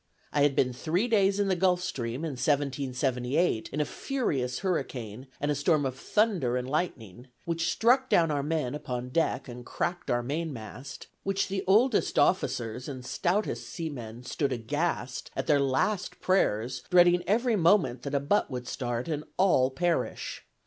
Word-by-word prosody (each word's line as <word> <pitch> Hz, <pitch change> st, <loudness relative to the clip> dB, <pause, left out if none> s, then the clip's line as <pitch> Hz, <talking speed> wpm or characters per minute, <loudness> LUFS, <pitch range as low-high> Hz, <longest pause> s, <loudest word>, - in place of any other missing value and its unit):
I 145 Hz, -, +2 dB
had 145 Hz, -1 st, +3 dB
been 125 Hz, -1 st, +2 dB
three 170 Hz, -, 0 dB
days 200 Hz, -3 st, +3 dB
in 200 Hz, -, +2 dB
the 190 Hz, -, +2 dB
Gulf 180 Hz, 0 st, +2 dB
Stream, 130 Hz, -4 st, -3 dB
in 160 Hz, -, -2 dB
1778, 135 Hz, 0 st, 0 dB
in 150 Hz, -, -3 dB
a 150 Hz, -, +2 dB
furious 140 Hz, -, -2 dB
hurricane 125 Hz, -, -3 dB
and 145 Hz, +1 st, 0 dB
a -, -, +3 dB
storm 145 Hz, +1 st, +2 dB
of 130 Hz, -1 st, -2 dB
thunder 175 Hz, -, +1 dB
and 125 Hz, 0 st, -3 dB
lightning, 130 Hz, -, -3 dB, 0.2 s
which 165 Hz, 0 st, 0 dB
struck 255 Hz, +3 st, +3 dB
down 165 Hz, -2 st, +4 dB
our 145 Hz, -1 st, 0 dB
men 150 Hz, -3 st, -1 dB
upon 125 Hz, -4 st, -4 dB
deck, 165 Hz, +2 st, 0 dB
and 120 Hz, 0 st, -8 dB
cracked 175 Hz, +7 st, -3 dB
our 120 Hz, 0 st, +1 dB
mainmast; 135 Hz, -3 st, -5 dB, 0.2 s
when 195 Hz, 0 st, -2 dB
the 195 Hz, 0 st, -2 dB
oldest 220 Hz, +5 st, +3 dB
officers 125 Hz, -8 st, +1 dB
and 130 Hz, -3 st, -7 dB
stoutest 185 Hz, +9 st, -1 dB
seamen 125 Hz, -8 st, -6 dB
stood 135 Hz, +2 st, -1 dB
aghast, 130 Hz, +1 st, -2 dB
at -, -, -2 dB
their 145 Hz, -2 st, +4 dB
last 140 Hz, +9 st, 0 dB
prayers, 125 Hz, -, +1 dB
dreading 175 Hz, 0 st, +6 dB
every 230 Hz, +4 st, +2 dB
moment 165 Hz, -, +3 dB
that 140 Hz, +2 st, -3 dB
a -, -, +3 dB
butt 145 Hz, +9 st, +1 dB
would 125 Hz, -2 st, -5 dB
start, 120 Hz, +1 st, -3 dB
and 150 Hz, -2 st, -2 dB
all 175 Hz, -9 st, +4 dB
perish. 170 Hz, +5 st, -2 dB
145 Hz, 165 wpm, -28 LUFS, 125-180 Hz, 0.2 s, dreading